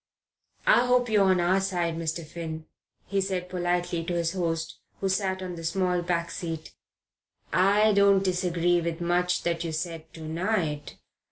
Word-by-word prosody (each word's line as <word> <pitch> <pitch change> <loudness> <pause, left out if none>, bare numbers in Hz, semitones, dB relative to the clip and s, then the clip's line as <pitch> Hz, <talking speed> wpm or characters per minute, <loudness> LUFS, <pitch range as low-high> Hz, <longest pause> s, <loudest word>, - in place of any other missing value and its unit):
"I 245 +1 +5
hope 250 -1 +3
you're 210 -2 +4
on 185 -1 +4
our 180 +3 +3
side, 175 -3 -1
Mr. 165 0 -3
Finn," 160 0 -6 0.4
he 200 -1 0
said 185 -2 -2
politely 175 -1 -1
to 175 - -2
his 170 0 0
host, 165 -3 -2 0.2
who 195 - 0
sat 190 -1 0
on 180 -1 -5
the 165 -1 -8
small 180 +1 +1
back 170 -1 -1
seat. 165 -3 -5 0.8
"I 205 +3 +4
don't 200 -1 +5
disagree 175 -2 +1
with 165 0 -3
much 180 +1 +1
that 170 -1 -1
you 165 - -3
said 160 0 -5
to 165 - -10
night. 165 -3 -1
175 Hz, 165 wpm, -27 LUFS, 165-190 Hz, 0.8 s, I